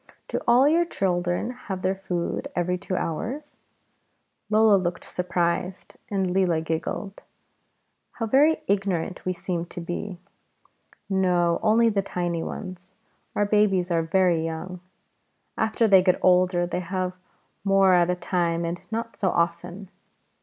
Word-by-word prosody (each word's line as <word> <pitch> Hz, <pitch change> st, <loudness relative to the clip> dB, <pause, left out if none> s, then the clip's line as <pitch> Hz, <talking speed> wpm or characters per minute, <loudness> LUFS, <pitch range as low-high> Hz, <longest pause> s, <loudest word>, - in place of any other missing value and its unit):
"Do -, -, -2 dB
all 245 Hz, +4 st, +6 dB
your 330 Hz, +3 st, +4 dB
children 180 Hz, -, -1 dB, 0.2 s
have 185 Hz, -1 st, -3 dB
their 185 Hz, +1 st, +2 dB
food 180 Hz, -3 st, -3 dB
every 180 Hz, +1 st, 0 dB
two 185 Hz, +1 st, -4 dB
hours?" 240 Hz, -, -4 dB, 0.9 s
Lola 215 Hz, -1 st, +5 dB
looked 180 Hz, -2 st, -1 dB
surprised, 180 Hz, +1 st, -2 dB
and 195 Hz, -2 st, 0 dB
Leela 180 Hz, -2 st, +1 dB
giggled: 170 Hz, +5 st, -4 dB, 0.9 s
how 225 Hz, -, -3 dB
very 285 Hz, +8 st, +3 dB
ignorant 190 Hz, -3 st, -1 dB
we 185 Hz, -, 0 dB
seemed 175 Hz, -1 st, -4 dB
to -, -, -7 dB
be! 175 Hz, +3 st, -5 dB, 0.9 s
"No, 180 Hz, -3 st, +2 dB
only 225 Hz, +2 st, +4 dB
the 205 Hz, -3 st, +1 dB
tiny 175 Hz, -3 st, -3 dB
ones; 185 Hz, 0 st, -7 dB, 0.4 s
our 205 Hz, -, +2 dB
babies 200 Hz, -4 st, +2 dB
are 165 Hz, -1 st, +2 dB
very 170 Hz, 0 st, +2 dB
young. 165 Hz, +3 st, -5 dB, 0.8 s
After 220 Hz, +1 st, +1 dB
they 195 Hz, -3 st, +7 dB
get 185 Hz, -1 st, +3 dB
older 180 Hz, -1 st, +4 dB
they 180 Hz, 0 st, -3 dB
have 185 Hz, +1 st, -3 dB, 0.5 s
more 195 Hz, -1 st, +4 dB
at 175 Hz, -1 st, +4 dB
a 180 Hz, -, +1 dB
time 170 Hz, -2 st, -1 dB
and 170 Hz, +1 st, -4 dB
not 230 Hz, +1 st, -4 dB
so 190 Hz, -, 0 dB
often. 175 Hz, +3 st, -2 dB
185 Hz, 140 wpm, -25 LUFS, 175-200 Hz, 0.9 s, they